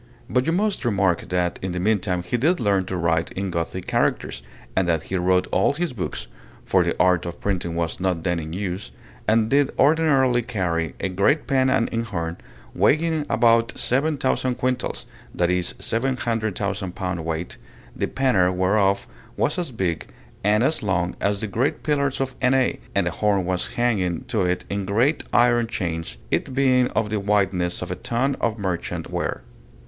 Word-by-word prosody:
But 125 +3 +1
you - - +3
must 200 +1 0
remark 100 -7 +1
that 90 -1 0
in 95 -1 -3
the 90 - -2
mean 105 +3 +2
time 90 -2 -2
he 90 - -2
did 155 +9 +2
learn 100 -5 +2
to 95 0 -3
write 80 -1 +1
in 95 0 -3
Gothic 85 +2 -3
characters, - - 0 0.3
and 95 -1 +2
that 80 -3 +1
he 95 - -4
wrote 90 0 +2
all 95 - +3
his 170 -1 -2
books 75 - -4 0.4
for - - +3
the - - -1
art 90 -1 +4
of 85 - -7
printing 90 -4 -2
was 85 -1 -2
not 90 -3 -1
then 90 -2 0
in 80 0 -6
use 95 +2 -4 0.4
and 110 0 +3
did 140 +3 +3
ordinarily 140 -4 +4
carry 90 -9 -2
a - - -1
great 100 - +2
pen 130 -1 +2
and 115 - +2
inkhorn, 95 -8 -3 0.4
weighing 155 -1 +2
about 115 0 +3
seven 145 +5 +1
thousand 130 -1 0
quintals 125 0 -2 0.3
(that 90 0 +2
is, 90 -1 -1
700,000 110 -6 -2
pound 90 -4 -3
weight), 80 +1 -4 0.4
the - - -1
penner 105 -10 +2
whereof 95 +2 +2 0.3
was 150 - +1
as 170 -6 -3
big 90 -8 -2 0.4
and 105 +3 +3
as 155 +4 +2
long 90 -4 0
as 100 0 0
the 110 - -2
great 115 +8 -1
pillars 140 -3 0
of 135 -1 -1
Enay, 130 0 +2 0.2
and 100 -2 +2
the 90 - 0
horn 100 0 +1
was 90 0 -1
hanging 105 -6 0
to 120 -6 -1
it 90 0 -1
in 100 0 -2
great 115 - +1
iron 120 -1 +4
chains, 85 - -3
it 130 - -1
being 130 -2 +4
of 110 -2 0
the 105 - 0
wideness 95 -4 0
of 90 - -6
a - - -1
tun 120 +9 0
of 115 -1 0
merchant 95 -4 -3
ware. - - -2
100 Hz, 180 wpm, -23 LUFS, 90-125 Hz, 0.4 s, art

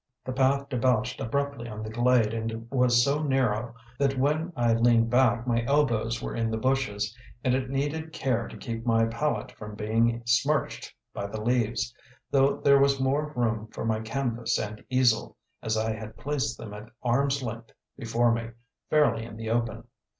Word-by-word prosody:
The 130 - -3
path 135 +1 +2
debouched 125 -2 0
abruptly 140 0 -2
on 110 0 -6
the 110 - -6
glade 120 -1 +3
and 115 0 -4
was 125 -2 +4
so 140 +3 +1
narrow 125 -5 0 0.2
that 135 -1 +1
when 150 +6 +1
I 120 -2 +2
leaned 115 0 +3
back 120 -2 +3
my 120 -1 +1
elbows 115 -5 +1
were - - -4
in 115 -1 0
the 110 - -1
bushes, 110 -4 0 0.3
and 125 - +2
it 130 0 -1
needed 145 +4 -2
care 125 -7 -1
to - - -10
keep 115 -2 -5
my 115 -1 +3
palette 115 +7 -2
from 105 -1 -9
being 115 +2 +1
smirched 135 +5 +1 0.2
by 100 - -4
the 110 +2 -6
leaves; 120 +1 0 0.4
though 135 0 +4
there 140 -1 +6
was 140 0 +3
more 140 +3 0
room 115 -3 0
for 110 - -6
my 110 -1 +1
canvas 115 0 -1
and 105 0 -5
easel, 125 -3 +2 0.2
as 110 0 -1
I 110 0 0
had 110 0 -8
placed 135 -5 -2
them 105 -2 -8
at 105 +2 -9
arm's 135 +3 +1
length 115 -1 -6 0.2
before 115 +1 +1
me, 115 0 -2 0.4
fairly 130 -7 +3
in 115 -1 -9
the 110 0 -4
open. 115 -1 -1
120 Hz, 180 wpm, -27 LUFS, 115-135 Hz, 0.4 s, there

